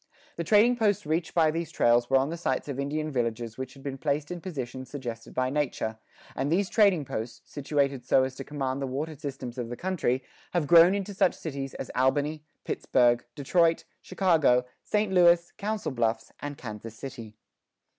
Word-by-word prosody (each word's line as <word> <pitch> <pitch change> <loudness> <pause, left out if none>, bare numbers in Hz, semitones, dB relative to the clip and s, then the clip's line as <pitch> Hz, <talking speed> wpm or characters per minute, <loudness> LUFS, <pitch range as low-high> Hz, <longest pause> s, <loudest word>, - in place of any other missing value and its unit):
[14:1] - - -34
The 170 - -1
trading 220 +7 +5
posts 210 -7 +1
reached 160 +2 -1
by 160 -2 +4
these 165 +1 -3
trails 120 0 +3
were 135 - +5
on 135 +3 +1
the - - -3
sites 140 -6 -2
of 140 -2 -4
Indian 155 +2 -2
villages 115 -2 -2
which 130 0 -6
had 135 - -14
been 135 -2 -5
placed 145 +2 -1
in 175 -1 -5
positions 130 -7 -6
suggested 120 -5 -6
by 130 0 0
nature; 125 -6 -2 0.4
and 135 +3 -1
these 190 +3 +1
trading 195 -9 +4
posts, 115 -1 -5
situated 140 -2 -1
so 130 +1 +4
as 130 0 -2
to 135 - -7
command 135 -1 -3
the 135 - -1
water 145 +5 -3
systems 135 -3 -6
of 120 -1 -4
the 120 - -5
country, 160 -9 -1 0.3
have 175 -4 +1
grown 170 +4 +7
into 200 0 -3
such 185 - +2
cities 140 -4 -5
as - - -6
Albany, 145 +4 +1 0.2
Pittsburgh, 120 -1 +2
Detroit, 165 +3 +2 0.2
Chicago, 160 -10 +3 0.2
St. 210 -2 0
Louis, 175 -1 +5
Council 210 -4 -2
Bluffs, 115 -3 -1
and 145 -1 -6
Kansas 110 -1 -8
City. 115 -5 -8
140 Hz, 185 wpm, -28 LUFS, 130-170 Hz, 0.4 s, grown